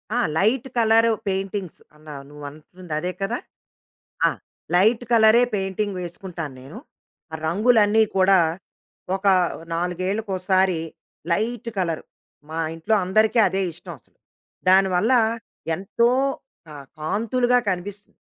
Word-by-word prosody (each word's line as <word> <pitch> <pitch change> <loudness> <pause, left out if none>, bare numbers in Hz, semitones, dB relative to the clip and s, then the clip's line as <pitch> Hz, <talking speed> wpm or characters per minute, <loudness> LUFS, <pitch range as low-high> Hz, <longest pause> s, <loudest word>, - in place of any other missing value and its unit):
ఆ! - - +1 0.2
Light 230 +7 +1
colour 225 0 +4 0.2
paintings 195 -1 -3 0.2
అన్నవు, 150 -2 -10
నువ్వంటుందదే 155 +4 -6
కదా! 230 +5 -1 0.9
ఆ! - - 0 0.4
లైట్ 220 +6 +3
కలరే 225 +1 +6
పెయింటింగ్ 195 0 -2
వేసుకుంటాను 175 -5 -7
నేను. 150 +12 -10 0.5
ఆ - - -4
రంగులన్నీ 215 +3 +4
కూడా 190 0 +5 0.8
ఒక 195 +1 -6 0.5
నాలుగేళ్లకోసారి 185 0 0 0.5
లైట్ 230 +4 -2
కలరు, 165 -4 -2 0.5
మా 160 - -4 0.2
ఇంట్లో 185 +7 0
అందరికీ 215 +5 +2
అదే 195 0 -1
ఇష్టం 175 +1 -10
అసలు. - - -33 0.5
దానివల్ల 190 +4 +4 0.6
ఎంతో 225 +5 +1 0.6
క - - -19 0.3
కాంతులుగా 230 +9 +1
కనిపిస్తుంది. 200 +3 -6
195 Hz, 100 wpm, -23 LUFS, 175-220 Hz, 0.9 s, కలరే